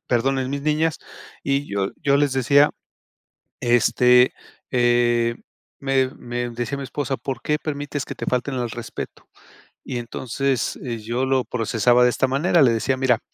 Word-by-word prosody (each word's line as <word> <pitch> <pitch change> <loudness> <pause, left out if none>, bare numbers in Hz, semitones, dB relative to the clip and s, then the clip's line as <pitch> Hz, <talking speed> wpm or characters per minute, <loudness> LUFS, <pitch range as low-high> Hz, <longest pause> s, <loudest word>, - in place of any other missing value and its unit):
perdón, 135 +3 +1
en 130 -1 -2
mis 140 0 -3
niñas, 155 +1 +1 0.4
y 140 +1 0
yo 100 -1 -1
yo 140 -1 +2
les 145 -1 +2
decía 140 +3 +4 0.9
este, 125 +1 +4 0.4
eh, 120 -1 +2 0.5
me 135 -1 +2
me 120 0 -4
decía 120 +4 -4
mi 135 - -5
esposa: 135 0 -3
"¿Por 130 -3 -5
qué 150 - +1
permites 145 -1 -4
que - - -7
te - - -6
falten 125 +2 -1
al 120 -2 -2
respeto?". 120 +1 -8 0.5
Y 125 - -5
entonces, 125 +2 -2
eh, 120 -2 -3
yo 120 +4 -2
lo 130 -1 +1
procesaba 120 +1 +2
de 125 - +5
esta 130 - +1
manera, 150 +6 +2
le 130 -5 +5
decía: 130 +4 0
"Mira, 125 -3 +2
130 Hz, 160 wpm, -22 LUFS, 120-140 Hz, 0.9 s, de